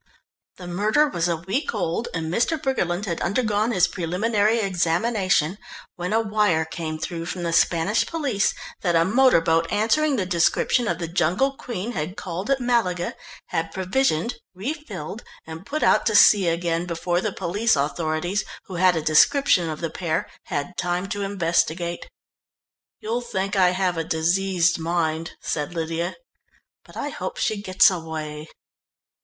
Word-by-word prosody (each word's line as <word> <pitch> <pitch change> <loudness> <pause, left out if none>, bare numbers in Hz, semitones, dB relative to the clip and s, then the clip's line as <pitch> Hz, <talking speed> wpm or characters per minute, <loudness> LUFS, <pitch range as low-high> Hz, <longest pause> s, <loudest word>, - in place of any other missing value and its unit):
The 180 - -9
murder 210 +12 +2
was 170 - -1
a 170 - +1
week 195 - -2
old, 195 +3 -1
and 165 -1 -3
Mr. 295 - +1
Briggerland 200 -9 -1
had 170 -4 -3
undergone 215 +3 +1
his 180 -7 +3
preliminary 205 +6 0
examination, 185 -2 +1 0.4
when 180 +2 -4
a 220 - +3
wire 210 -7 +1
came 160 -1 -5
through 165 +1 -5
from 180 0 -4
the 170 -1 -1
Spanish 170 +5 +2
police 280 -11 0 0.3
that 175 -3 +1
a 165 0 +4
motor 250 +1 +5
boat 165 0 +1
answering 275 +8 +2
the 200 -6 -1
description 180 +7 +2
of 170 - 0
the 170 -1 -4
Jungle 180 - +1
Queen 235 -4 -5
had 180 -2 -4
called 185 +4 -5
at 275 -1 +2
Malaga, 215 -8 0 0.4
had 165 -1 -2
provisioned, 190 - 0 0.2
refilled, 210 - -6 0.2
and 160 +5 -9
put 305 +1 -2
out - - +4
to 220 - +1
sea 200 -3 +7
again, 170 0 0
before 175 +1 -1
the 215 - -1
police 205 +5 +1
authorities, 155 +6 -1 0.2
who 185 - -7
had 185 0 +4
a 160 - -1
description 175 - +4
of 155 - -5
the 165 - -2
pair, 165 -4 -2 0.2
had 145 +6 -4
time 180 +1 -1
to 205 -1 -3
investigate. 175 -3 -1 0.9
"You'll 225 +3 -2
think 200 -4 -3
I 185 -2 +5
have 180 -1 0
a 165 - 0
diseased 175 +2 +1
mind," 165 -1 -1
said 150 +3 -3
Lydia, 165 +1 -2 0.7
"but - - -14
I - - -3
hope - - -5
she 215 -2 -1
gets 195 +1 +5
away." 155 -3 -6
180 Hz, 160 wpm, -23 LUFS, 165-215 Hz, 0.9 s, sea